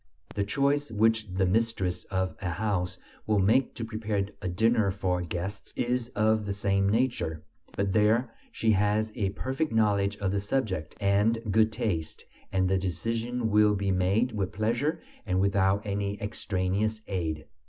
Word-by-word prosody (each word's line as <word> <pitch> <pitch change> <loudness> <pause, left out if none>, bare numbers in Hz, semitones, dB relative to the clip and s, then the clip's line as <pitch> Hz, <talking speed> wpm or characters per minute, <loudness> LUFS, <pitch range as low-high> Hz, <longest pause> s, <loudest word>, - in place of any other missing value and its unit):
The 100 - 0
choice 140 +7 +1
which 110 0 +2
the 95 +1 +1
mistress 95 -2 0
of 95 -1 -2
a 90 - -2
house 90 -1 -1 0.3
will 110 -1 +3
make 110 +7 +3
to 115 0 -4
prepare 110 -3 -2 0.2
a - - -3
dinner 110 +3 +2
for 90 -2 -1
guests 90 +3 -5
is 125 0 0
of 110 0 +2
the 100 - -1
same 100 0 +1
nature; 110 -9 0 0.3
but 100 -1 -1
there 110 +3 +3 0.2
she 110 - +1
has 105 +2 +2
a 100 -4 -1
perfect 135 +9 -2
knowledge 105 -2 +2
of 100 -2 -1
the 100 - 0
subject, 100 - -2
and 100 +3 +3
good 110 +1 +4
taste, 80 -8 -3 0.3
and 95 -1 +2
the 95 0 +2
decision 115 +6 -2
will 105 0 +5
be 100 -1 0
made 95 +7 +2
with 100 -4 -2
pleasure 120 - 0 0.3
and 95 0 +1
without 100 +1 +2
any 100 0 -2
extraneous 105 +1 -1
aid. 80 -5 -3
105 Hz, 160 wpm, -28 LUFS, 95-110 Hz, 0.3 s, will